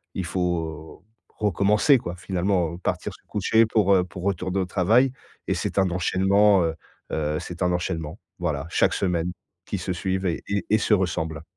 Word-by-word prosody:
il 95 - -2
faut 85 -3 -3 0.3
recommencer 105 - +3
quoi. 90 -5 -6
Finalement, 90 -2 -1
partir - - -2
se - - -18
coucher 110 +2 +3
pour, 105 -3 +3
heu, 90 - +3
pour 90 0 -9
retourner 95 0 -1
au 95 - 0
travail 110 +9 +3 0.4
et - - +1
c'est - - -3
un 95 -1 +3
enchaînement 95 +2 +3
heu 80 - -2 0.4
heu, 75 0 -1
c'est 90 0 -8
un 90 -1 +2
enchaînement, 80 -3 -3 0.2
voilà, 80 -4 -2
chaque - - +3
semaine 90 -2 0 0.4
qui - - -2
se 90 - -3
suivent 95 +2 -2
et 85 -3 -1
et 100 -2 -1
et 110 - +6
se 105 - +2
ressemblent. 80 -5 -2
90 Hz, 175 wpm, -24 LUFS, 85-100 Hz, 0.4 s, et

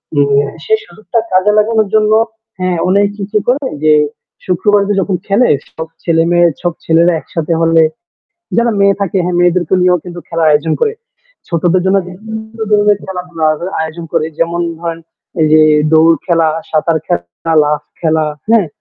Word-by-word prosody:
অ্যা 140 0 +2 0.2
সেই 440 0 +2
সুযোগটা 215 - -3
কাজে 185 +3 +3
লাগানোর 220 0 +2
জন্য, 215 0 +3 0.5
হ্যাঁ, 185 -1 -1
অনেক 200 +1 +3
কিছু 205 +2 -2
করে 265 +3 +1 0.2
যে 155 - +5 0.5
শুক্রবার 200 +3 +2
তো - - +2
যখন 190 -1 -1
খেলে 210 +5 +3 0.2
সব 160 0 -6 0.2
ছেলে-মেয়ে, 170 +1 +3
সব 175 -2 -1
ছেলেরা 170 +2 +3
একসাথে 165 +1 -3
হলে 165 0 +4 0.7
যারা 235 0 +2
মেয়ে 200 0 +3
থাকে, 195 -1 -1
হ্যাঁ 180 0 -1
মেয়েদেরকে 175 0 +2
নিয়েও 180 -2 +2
কিন্তু 175 -1 -8
খেলার 165 -2 +1
আয়োজন 150 +2 +2
করে। 445 -1 +1 0.5
ছোটদের 175 +2 +1
জন্য 195 +1 +3
বিভিন্ন 220 +4 -9
ধরনের 205 -1 +3
খেলাধুলা 180 -3 -5
আয় 155 - -1 0.2
আয়োজন 160 +1 -5
করে। 155 - +1
যেমন 170 +1 0 0.2
ধরেন 165 -1 -4 0.4
এই 155 - +4
যে 155 - +6 0.3
দৌড় 160 +1 +5
খেলা, 165 -2 +2 0.2
সাঁতার 160 +1 +1
খেলা, 85 - -3
লাফ 150 0 -1 0.2
খেলা, 160 -1 +1 0.3
হ্যাঁ? 225 -5 +4
175 Hz, 160 wpm, -13 LUFS, 165-200 Hz, 0.7 s, যে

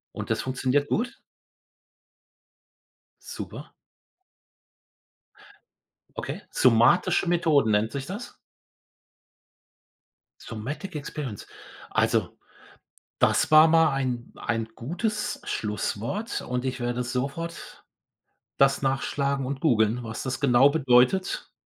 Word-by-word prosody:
Und - - -6
das - - 0
funktioniert 130 +2 0
gut? 235 +2 -2 2.1
Super. - - -8 2.4
Okay, - - -5
somatische 130 +9 +3
Methoden 160 -9 +3
nennt 105 +2 +1
sich 135 +1 -4
das? 210 - -7 2.1
Sometic 145 - -6
Experience. 145 -6 -6 0.4
Also, - - 0 0.8
das - - +2
war 155 +1 +9
mal 165 -1 +5
ein 125 -3 -3
ein 115 -1 -2
gutes 210 - -3
Schlusswort 110 - -3
und 125 0 -3
ich 130 -1 -3
werde 120 +1 -2
sofort 140 +8 -5 0.7
das 135 0 +3
nachschlagen 135 0 -1
und 135 +1 -4
googeln, 115 -4 +2
was 110 -1 -6
das 130 -1 -3
genau 135 0 +5
bedeutet. 140 +4 +2
135 Hz, 90 wpm, -26 LUFS, 120-160 Hz, 2.4 s, war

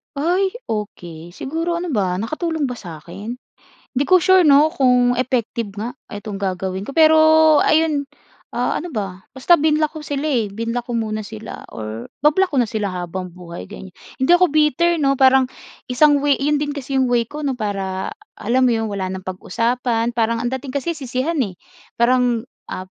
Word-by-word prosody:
Ay, 360 +7 +1 0.2
okey. 175 -6 -6
Siguro 330 - -3
ano 355 - -4
ba, 190 - 0
nakatulong 310 - -2
ba 250 - -4
sa 170 -8 -9
akin? 195 +8 -8 0.6
Hindi 275 +2 0
ko 370 -2 +5
sure 375 -2 +5
'no, 295 +2 +6
kung 250 -5 +3
effective 235 -4 -2
nga 220 +3 -4 0.2
itong 205 -1 -7
gagawin 190 0 -3
ko, 275 - -7
pero 315 -1 +6 0.4
ayun. 310 -3 +2 0.4
Ah, - - -1
ano 350 - -7
ba? 195 -3 -4
Basta 270 +6 +3
binlock 310 +1 +1
ko 310 - -6
sila 290 0 -3
eh, 250 -8 +1
binlock 230 +3 -3
ko - - -2
muna 215 -2 -2
sila 215 +1 -9
or 110 +1 -7
ba-block 310 +7 +3
ko 280 - 0
na 240 - +3
sila 210 -2 -2
habang 180 0 -5
buhay, 170 -1 -9
ganiya 190 -3 -10 0.3
hindi 260 - +2
ako 365 +1 +5
bitter, 310 +3 +2
'no? 275 -1 +3
Parang 265 -1 +5 0.4
isang 290 +3 +5
way 290 -1 +4
'yon 290 +1 +1
din 290 - -2
kasi 275 -1 -5
yung 260 - +3
way 235 -1 +2
ko, 300 +1 -6
'no, 275 -2 -1
para, 195 -3 -3 0.3
alam 250 +5 +1
mo - - +3
'yon, 225 0 -1
wala 195 -2 -3
nang 190 0 -6
pag-usapan. 230 +5 -1
Parang 230 0 +1
ang 240 - -1
dating 265 +1 -5
kasi 335 +5 -1
sisihan 265 +5 -2
eh. 195 -5 -4 0.4
Parang, 245 -1 +3 0.3
ah, 185 - -5
245 Hz, 185 wpm, -20 LUFS, 205-295 Hz, 0.6 s, no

